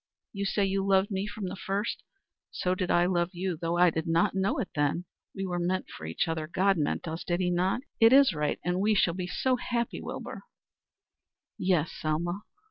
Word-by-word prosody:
You 200 -1 -2
say 200 +1 +1
you 195 0 0
loved 195 +1 +3
me 195 +1 -1
from 210 -1 -5
the - - -5
first; 195 +3 -2 0.5
so 180 - -1
did 185 -1 -2
I 175 0 +4
love 175 -1 +1
you, 180 0 -2
though 170 +1 -2
I 175 -1 +6
did 160 +1 -3
not 165 0 +2
know 195 +1 0
it 230 -9 -2
then. 145 +4 0 0.3
We 195 - -3
were 175 -1 -2
meant 185 +2 -1
for 80 +1 -7
each 80 - -1
other 160 -1 -2
God 195 +4 +2
meant 155 0 -1
us 160 +1 -4
did 175 0 -1
he 180 -1 +1
not? 185 +6 +1 0.2
It 225 0 +7
is 275 -3 +7
right, 150 -1 -1
and 180 +1 +1
we 210 +2 +3
shall 175 -3 +3
be 180 0 -4
so 255 +7 +1
happy, 235 -1 -2
Wilbur." - - -6 1.2
"Yes, 175 -4 +1
Selma." 170 +5 -2
180 Hz, 210 wpm, -29 LUFS, 170-195 Hz, 1.2 s, It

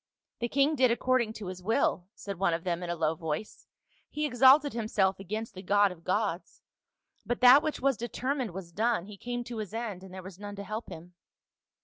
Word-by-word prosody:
"The 235 - -2
king 280 +4 +3
did 255 -2 +4
according 240 -1 +1
to 215 - -8
his 185 0 -6
will," 190 -3 +1
said 200 -3 -7
one 175 -4 +2
of 165 - -6
them 175 -1 -2
in 175 - -5
a 175 - -1
low 160 -1 +1
voice. 160 +4 -5 0.2
" - - -37
He 300 0 -2
exalted 275 +2 +5
himself 205 -4 0
against 215 +4 -5
the 185 - -8
God 200 +1 +3
of 170 -2 -12
gods; 190 -2 -2 0.6
but 240 - -2
that 255 +3 +9
which 310 - -3
was 270 -2 +2
determined 255 +1 -2
was 175 -1 -8
done; 220 0 0
he 210 0 -10
came 240 +4 -4
to 240 -1 -7
his 215 0 -6
end 215 -6 -4
and 190 - -11
there 185 0 -8
was 190 0 -11
none 205 0 -7
to 200 - -6
help 215 +3 -5
him." 170 +2 -10
210 Hz, 220 wpm, -29 LUFS, 185-240 Hz, 0.6 s, that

